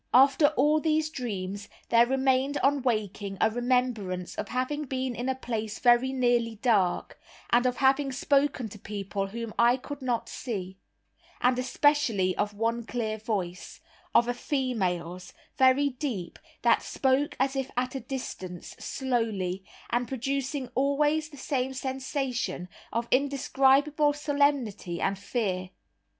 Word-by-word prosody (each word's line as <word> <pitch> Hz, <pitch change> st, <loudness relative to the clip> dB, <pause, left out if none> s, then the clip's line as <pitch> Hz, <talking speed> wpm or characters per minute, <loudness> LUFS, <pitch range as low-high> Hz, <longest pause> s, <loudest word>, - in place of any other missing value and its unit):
After 275 Hz, +3 st, +6 dB
all 300 Hz, +3 st, +4 dB
these 310 Hz, 0 st, +1 dB
dreams 200 Hz, -7 st, -4 dB, 0.2 s
there 235 Hz, 0 st, +5 dB
remained 265 Hz, +2 st, +2 dB
on 280 Hz, 0 st, +3 dB
waking 205 Hz, -5 st, -2 dB
a 220 Hz, -, +3 dB
remembrance 240 Hz, -7 st, 0 dB
of -, -, -4 dB
having 275 Hz, +4 st, -2 dB
been 260 Hz, -1 st, -2 dB
in 245 Hz, +3 st, -2 dB
a 265 Hz, -, 0 dB
place 220 Hz, -4 st, -4 dB
very 245 Hz, +1 st, +4 dB
nearly 240 Hz, -3 st, +1 dB
dark, 205 Hz, -5 st, +1 dB, 0.3 s
and 245 Hz, +1 st, +4 dB
of 250 Hz, -, -1 dB
having 270 Hz, +1 st, +3 dB
spoken 275 Hz, -1 st, +1 dB
to 210 Hz, -, -11 dB
people 195 Hz, -1 st, -4 dB
whom 230 Hz, +2 st, -6 dB
I 240 Hz, +2 st, +5 dB
could 285 Hz, +2 st, -8 dB
not 245 Hz, -3 st, -1 dB
see; 190 Hz, -6 st, -5 dB, 0.6 s
and 250 Hz, 0 st, +2 dB
especially 255 Hz, -8 st, +2 dB
of 205 Hz, 0 st, -1 dB
one 230 Hz, +2 st, 0 dB
clear 220 Hz, -2 st, -3 dB
voice, 195 Hz, -5 st, -4 dB, 0.4 s
of 235 Hz, -, +6 dB
a 245 Hz, -, +1 dB
female's, 185 Hz, -, -2 dB, 0.2 s
very 265 Hz, +2 st, +4 dB
deep, 250 Hz, -, -5 dB, 0.2 s
that -, -, +4 dB
spoke 270 Hz, +2 st, +1 dB
as 265 Hz, +1 st, +1 dB
if 270 Hz, -1 st, -2 dB
at 255 Hz, 0 st, 0 dB
a 270 Hz, -, -3 dB
distance, 190 Hz, -10 st, -6 dB
slowly, 220 Hz, -8 st, -2 dB, 0.3 s
and 240 Hz, +1 st, +1 dB
producing 270 Hz, +1 st, -2 dB
always 295 Hz, +3 st, +1 dB
the 290 Hz, -, -13 dB
same 265 Hz, -1 st, -2 dB
sensation 260 Hz, -7 st, -3 dB, 0.2 s
of 230 Hz, +1 st, -1 dB
indescribable 280 Hz, +2 st, +3 dB
solemnity 285 Hz, -, 0 dB
and 195 Hz, -, 0 dB
fear. 190 Hz, -4 st, -2 dB
250 Hz, 135 wpm, -28 LUFS, 215-270 Hz, 0.6 s, After